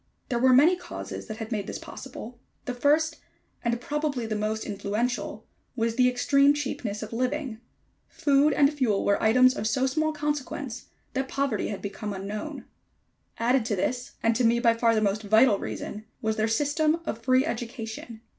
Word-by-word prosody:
There 240 -3 0
were 260 +1 +5
many 295 +8 +6
causes 355 - -7
that 215 -2 -6
had 225 0 -6
made 205 -3 -2
this - - -4
possible. 245 -2 -9 0.3
The 250 - -2
first, 305 +5 +2 0.5
and 235 -1 0
probably 290 -2 -2
the 220 -1 -2
most 215 +1 -2
influential, 210 +4 -2 0.3
was 230 -1 0
the 250 +1 +4
extreme 275 +3 +4
cheapness 235 -7 -3
of 215 - -7
living. 255 -1 -2 0.5
Food 285 +1 +3
and 285 +1 +4
fuel 240 -9 +1
were 200 - +2
items 255 +3 +5
of 215 - -2
so 260 +4 +1
small 310 +4 +1
consequence, 290 -4 -4 0.3
that 265 0 -1
poverty 275 -6 -1
had 200 - -5
become 205 +1 -4
unknown. 200 +2 -5 0.7
Added 245 +2 +2
to 220 -3 0
this, 245 +6 -2
and 230 0 +3
to 250 - +1
me 235 +1 +4
by 235 -1 +4
far 230 0 +2
the 215 - +2
most 205 0 +1
vital 220 0 +4
reason, 215 +1 -6
was 220 -2 -1
their 215 0 +1
system 300 +7 +1
of 230 - -3
free 255 +3 +3
education. 230 -3 -5
245 Hz, 175 wpm, -27 LUFS, 220-275 Hz, 0.7 s, many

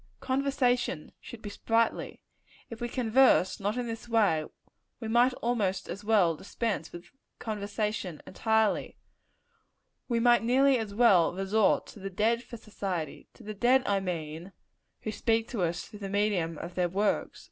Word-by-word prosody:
Conversation 260 - 0
should 235 - -11
be 205 - -6
sprightly. 225 +2 -1 0.5
If 230 - -8
we 240 - -2
converse 250 -5 +3
not 205 +4 -1
in 245 - -1
this 230 0 -6
way, 200 -9 +2 0.5
we 225 - -5
might 240 +3 +4
almost 215 -6 0
as 195 +4 -6
well 205 -6 +3
dispense 215 +5 -3
with 175 0 -11 0.3
conversation 210 -5 -3
entirely. 220 -1 0 1.1
We 235 -2 +1
might 240 0 +5
nearly 260 +3 +4
as 210 -3 -5
well 200 -8 +5
resort 195 +3 +2
to - - -13
the 195 0 -5
dead 220 +5 +1
for 240 -1 -10
society; 190 -7 -5
to - - -15
the 215 - -6
dead, 250 +5 +3
I 200 -1 +1
mean, 170 -1 -5 0.5
who 215 - -3
speak 225 +1 0
to 230 -6 -3
us 170 -1 -1
through 210 - -12
the 200 -1 -5
medium 195 -5 0
of 170 +3 -7
their 180 -1 0
works. 200 +4 -1
215 Hz, 160 wpm, -29 LUFS, 190-235 Hz, 1.1 s, might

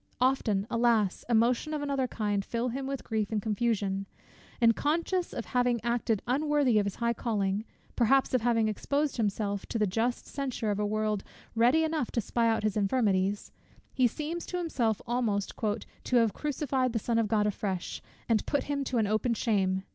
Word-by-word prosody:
Often, 245 -6 +2
alas! 230 -4 +2
emotions 240 +6 +2
of 295 - -3
another 275 -2 0
kind 205 -4 -1
fill 235 +4 -2
him 265 +3 -4
with 275 -1 -4
grief 220 -2 -2
and 215 - +1
confusion: 205 -2 -1 0.5
and 230 -2 +5
conscious 335 +4 0
of 235 - -5
having 245 -1 +1
acted 235 -3 0
unworthy 275 -2 +2
of 200 - 0
his 200 - -4
high 235 0 0
calling, 210 -3 -1 0.3
perhaps 265 +3 +3
of 255 - +3
having 230 -1 +2
exposed 280 +7 -1
himself 205 -2 -1
to - - -2
the 215 - +2
just 225 +5 -1
censure 255 -6 -3
of 205 - -2
a 210 - +1
world 215 -1 -1 0.3
ready 245 +8 +4
enough 315 -5 -1
to - - +1
spy 230 +1 +1
out 225 -1 +1
his 215 -2 0
infirmities, 200 -2 +1 0.4
he 255 -2 +4
seems 315 +7 -4
to 360 - -3
himself 245 - -1
almost 230 -5 -1 0.5
"to 255 - -1
have 230 -3 +4
crucified 270 -4 -1
the - - +1
Son 230 +1 0
of 225 - +1
God 210 0 +2
afresh, 195 -3 -3 0.3
and 225 -3 +2
put 285 - +1
him 285 -1 -2
to 255 - -1
an 220 - +3
open 215 +3 +1
shame." 190 -4 +1
230 Hz, 185 wpm, -29 LUFS, 210-255 Hz, 0.5 s, and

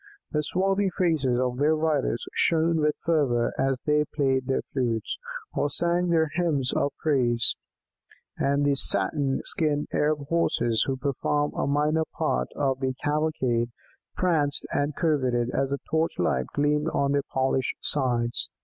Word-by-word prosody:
The 150 - +1
swarthy 195 +5 0
faces 145 -9 +1
of 125 -1 -1
their 150 +2 +3
riders 155 -6 0
shone 165 0 +2
with 150 0 +2
fervour 140 -8 +1
as 135 0 +1
they 150 0 +3
played 135 -3 +1
their 135 - 0
flutes, 120 -5 -1 0.4
or 145 - 0
sang 175 +4 0
their 160 -3 +2
hymns 150 -7 0
of 140 - +1
praise, 120 -6 +2 0.8
and 140 +1 +1
the 145 - +3
satin 140 0 +1
skinned 150 -2 0
Arab 150 -1 0
Horses, 120 -9 +1
who 135 -1 -1 0.2
formed 145 0 0
a - - -1
minor 150 +3 +1
part 60 0 0
of 135 -2 0
the 130 -1 -1
cavalcade, 145 -6 0 0.5
pranced 155 -6 +1
and 145 0 -1
curveted 130 -7 +1
as 135 +1 0
the 140 - -1
torch 160 +1 0
light 65 0 0
gleamed 150 +1 +1
on 140 -3 0
their 140 0 +2
polished 130 -1 0
sides. 120 -4 +1
145 Hz, 150 wpm, -26 LUFS, 130-155 Hz, 0.8 s, their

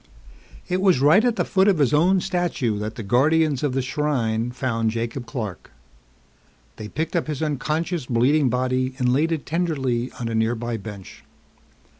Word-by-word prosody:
It 180 +1 -1
was 190 -8 +4
right 150 +10 +5
at 245 -2 +2
the - - 0
foot 190 +1 +2
of 195 -4 +4
his 145 -2 +2
own 180 +5 +4
statue 175 - -1
that 105 +1 -4
the 115 - -6
Guardians 145 +6 +2
of 145 -3 0
the 135 0 0
Shrine 125 -5 -1
found 120 -3 -1
Jacob 115 +2 -4
Clark. 110 - -6 1.1
They 105 - -7
picked 160 - -4
up 170 - 0
his 150 0 -3
unconscious, 155 +1 -2
bleeding 130 +4 +3
body 130 +1 -1
and 125 -2 +1
laid 155 +5 +1
it 160 -4 -2
tenderly 135 -8 -1
on 120 - -3
a 115 - -3
nearby 115 +1 -1
bench. 100 -2 -10
135 Hz, 170 wpm, -23 LUFS, 120-160 Hz, 1.1 s, right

